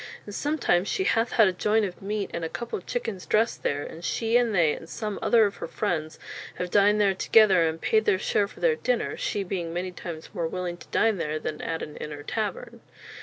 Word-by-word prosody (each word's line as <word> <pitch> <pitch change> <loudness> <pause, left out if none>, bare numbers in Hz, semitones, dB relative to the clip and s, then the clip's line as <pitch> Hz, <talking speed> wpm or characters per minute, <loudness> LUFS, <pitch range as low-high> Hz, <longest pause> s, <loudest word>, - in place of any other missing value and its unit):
And 205 - -8
sometimes 205 - +1
shee 385 - 0
hath 230 -9 +1
had 220 -3 +6
a 190 - +1
joint 210 +3 +2
of 180 -2 -7
meat 205 0 -3
and 170 - -3
a 165 - -2
cople 235 +3 -4
of - - -20
chickens 225 -6 -4
dressed 220 +2 +1
there; 145 0 -1
and 165 - -9
shee, 225 +5 0
and 240 -3 +3
they, 160 -4 +4
and 165 - -9
some 210 -3 -4
other 230 -2 +5
of 200 - -3
her - - -5
freinds, 160 -7 -2 0.4
have 180 -1 -4
dined 205 +1 +4
there 200 -2 +4
together, 190 -3 +5
and 160 +1 -5
paid 220 +4 +2
their 190 - +3
share 200 +1 +1
for - - -15
their 485 -2 +3
dinner, - - -1
shee 205 - -2
being 175 -3 -3
many 180 +2 -3
times 170 -3 -8
more 170 -5 -1
willing 175 0 -4
to - - -14
dine 225 -3 +2
there 155 -2 -2
than 155 0 -5
at 165 0 -3
an 150 - -8
inne 150 - -6
or 145 0 -8
taverne." 225 +6 -4
195 Hz, 235 wpm, -26 LUFS, 170-220 Hz, 0.4 s, had